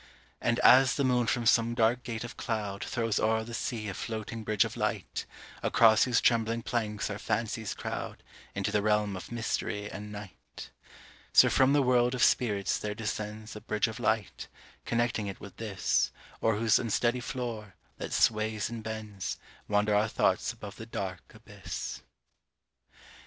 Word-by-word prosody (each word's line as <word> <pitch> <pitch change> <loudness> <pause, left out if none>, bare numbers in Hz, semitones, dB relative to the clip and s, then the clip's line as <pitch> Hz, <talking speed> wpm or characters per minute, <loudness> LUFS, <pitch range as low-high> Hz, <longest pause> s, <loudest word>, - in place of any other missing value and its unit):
And 115 0 +1
as 130 +1 +7
the 140 - +1
moon 125 -2 +2
from 120 -1 0
some 115 +1 +4
dark 120 +1 +3
gate 115 -2 -5
of 120 - -7
cloud 105 -4 -3
Throws 115 -3 -1
o'er 110 +1 +2
the 115 +1 -8
sea 115 -2 -3
a 100 - -3
floating 110 0 -5
bridge 105 -2 +2
of - - -6
light, - - -2 0.3
Across 110 -2 +5
whose 125 -2 +2
trembling 115 0 +2
planks 105 -4 -2
our 100 - -5
fancies 110 -1 -2
crowd - - -5 0.3
Into 100 +1 -1
the 105 -1 +2
realm 105 -1 +1
of 95 - -8
mystery 110 -3 -2
and 105 +2 -7
night, 105 -2 -10 0.6
So - - +8
from 135 +1 +4
the 145 -1 +4
world 125 0 +3
of 125 - +1
spirits 105 -6 +2
there 105 0 -3
descends 110 0 -5
A 105 - -8
bridge 105 +1 0
of 115 +2 -6
light, 110 -4 -1 0.4
connecting 120 -3 0
it 95 - -6
with 100 - -11
this, 105 -5 0 0.3
O'er 110 -1 +3
whose 110 -1 +3
unsteady 120 +1 +1
floor, 115 -5 -5 0.2
that - - -5
sways 110 0 +1
and 115 -1 -5
bends, 110 -3 -5 0.3
Wander 105 0 +2
our 105 +1 +3
thoughts - - +1
above 100 0 -10
the 110 - -8
dark 95 -5 -5
abyss. - - -7
110 Hz, 165 wpm, -30 LUFS, 105-120 Hz, 0.6 s, So